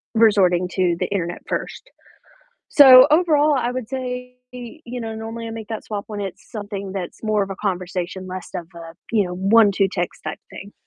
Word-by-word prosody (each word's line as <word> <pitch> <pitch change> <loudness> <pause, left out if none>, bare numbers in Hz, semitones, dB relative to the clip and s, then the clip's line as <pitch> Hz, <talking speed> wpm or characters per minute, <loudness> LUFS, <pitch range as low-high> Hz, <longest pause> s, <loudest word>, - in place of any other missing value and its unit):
resorting 190 -5 +4
to 180 -2 +1
the - - -1
internet 175 -3 -3
first?" - - -5 0.8
So, 265 -2 +9
overall, 305 -2 +4
I 245 -2 -1
would 250 -3 -5
say, 250 -1 -5 0.2
you 245 +1 -8
know, 225 -1 -5
normally 225 +1 -6
I - - -6
make 225 -1 -8
that 220 -2 -5
swap 205 -1 -5
when 210 -1 -5
it's 195 -2 -7
something 205 -3 -6
that's 190 +2 -6
more 215 -2 +1
of 195 - -5
a 195 - -5
conversation, 185 -1 -4
less 185 0 -7
of 175 -3 -5
a, 165 -1 -10 0.2
you 215 -3 +2
know, 180 -1 -5
1, 200 +3 +4
2 195 0 +2
text 175 -3 -4
type 155 - -5
thing. 200 +1 -10
210 Hz, 195 wpm, -21 LUFS, 185-245 Hz, 0.8 s, So